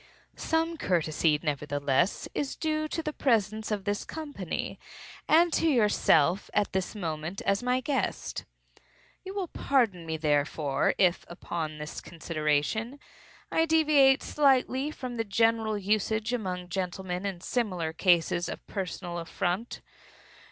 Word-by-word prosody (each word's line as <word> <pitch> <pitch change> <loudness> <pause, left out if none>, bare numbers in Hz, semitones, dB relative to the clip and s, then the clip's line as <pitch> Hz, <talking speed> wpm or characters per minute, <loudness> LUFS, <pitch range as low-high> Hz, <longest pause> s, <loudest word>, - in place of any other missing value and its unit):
Some 325 +1 0
courtesy, 160 - +1
nevertheless, 145 +2 0
is 285 -2 -2
due 310 -1 -1
to 325 +1 -3
the 305 - -3
presence 220 -5 +1
of 210 -3 -2
this 205 0 -1
company, 285 - -5 0.5
and 335 +1 +5
to 330 - +2
yourself, 205 - +3
at 205 - +1
this 190 +2 -2
moment, 165 -1 -4
as 200 0 +1
my 250 +1 +1
guest. 275 +1 -2 0.8
You 380 +1 -7
will 380 -4 -2
pardon 220 -12 +1
me, 160 0 -2
therefore, 145 -1 +1
if, 180 -2 +3
upon 165 -3 -5
this 150 0 -6
consideration, 165 - -1 0.5
I 325 0 +2
deviate 295 -4 +5
slightly 270 -1 +2
from 255 -5 -6
the 225 - +1
general 225 +1 +2
usage 215 +3 0
among 180 -6 -3
gentlemen 180 0 -3
in 195 -3 -3
similar 185 -9 -1
cases 175 0 +2
of - - -7
personal 180 -3 -4
affront. 180 +6 -3
200 Hz, 130 wpm, -28 LUFS, 170-255 Hz, 0.8 s, and